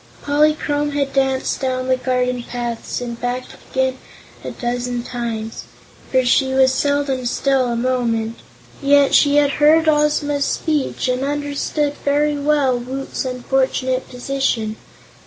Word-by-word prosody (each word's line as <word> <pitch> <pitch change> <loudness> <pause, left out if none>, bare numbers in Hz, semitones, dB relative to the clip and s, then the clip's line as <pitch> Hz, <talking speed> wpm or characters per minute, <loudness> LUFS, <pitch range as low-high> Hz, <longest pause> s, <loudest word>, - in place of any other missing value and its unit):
Polychrome 295 0 +1
had 280 -1 -1
danced 265 -1 0
down 255 -1 -1
the 260 - +3
garden 250 -1 -1
paths 240 0 -4
and 235 -1 -6
back 245 +1 -2 0.3
again 260 0 0 0.4
a - - -4
dozen 245 0 -3
times, 230 -3 -5 0.5
for 260 -1 +3
she 265 +1 +2
was 265 0 +4
seldom 285 -1 0
still 265 0 +1
a 240 - -1
moment, 235 -2 -1 0.4
yet 280 0 +4
she 285 -1 +5
had 290 -1 +4
heard 320 +2 +5
Ozma's 295 -1 +2
speech 300 -4 -1
and 250 0 0
understood 290 +1 -1
very 295 +1 +2
well 285 -3 +2
Woot's 265 +2 -5
unfortunate 260 0 -1
position. 245 -4 -1
265 Hz, 130 wpm, -19 LUFS, 250-285 Hz, 0.5 s, she